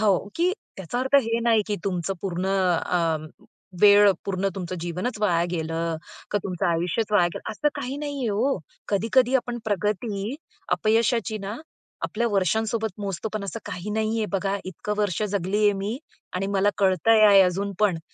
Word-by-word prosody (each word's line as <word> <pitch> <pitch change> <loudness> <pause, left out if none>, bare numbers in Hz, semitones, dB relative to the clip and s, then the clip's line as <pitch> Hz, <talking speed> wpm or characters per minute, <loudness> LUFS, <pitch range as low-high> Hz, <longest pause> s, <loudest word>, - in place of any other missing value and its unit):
हो, 205 -2 +2
की 355 +2 +2 0.2
त्याचा 190 +6 -4
अर्थ 265 +2 -1
हे 230 0 -1
नाही, 225 -2 +4
की 205 -1 -1
तुमचं 185 -1 -1
पूर्ण 185 -1 -2
अ, 180 -3 +1 0.7
वेळ, 205 0 +8
पूर्ण 195 0 -1
तुमचं 185 -1 -4
जीवनच 180 +7 -3
वाया 175 -5 +2
गेलं 165 -1 -2 0.3
का, 205 - +1
तुमचं 180 -3 -1
आयुष्यच 175 +6 0
वाया 180 -4 +5
गेलं, - - -6
असं 295 +8 +1
काही 270 0 -4
नाही 290 -1 -4
आहे 235 - 0
हो. 225 +4 +1 0.3
कधी-कधी 235 +5 +2
आपण 245 -1 -3
प्रगती 205 +3 -1 0.4
अपयशाची 225 0 +1
ना, 200 +3 -5 0.5
आपल्या 235 +2 -1
वर्षांसोबत 220 +3 +1
मोजतो, 200 +1 -3
पण 205 -2 -2
असं 215 +3 -5
काही 180 +4 -5
नाहीये 220 +1 0
बघा. 195 +1 0
इतकी 185 +3 -5
वर्ष 205 -2 0
जगलेय 205 +1 +1
मी 205 +6 -3 0.4
आणि 195 +2 -1
मला 200 +1 +3
कळतंय 200 +3 +4
आहे 200 -1 +8
अजून 190 +2 0
पण, 190 -6 +3
205 Hz, 160 wpm, -25 LUFS, 185-225 Hz, 0.7 s, वेळ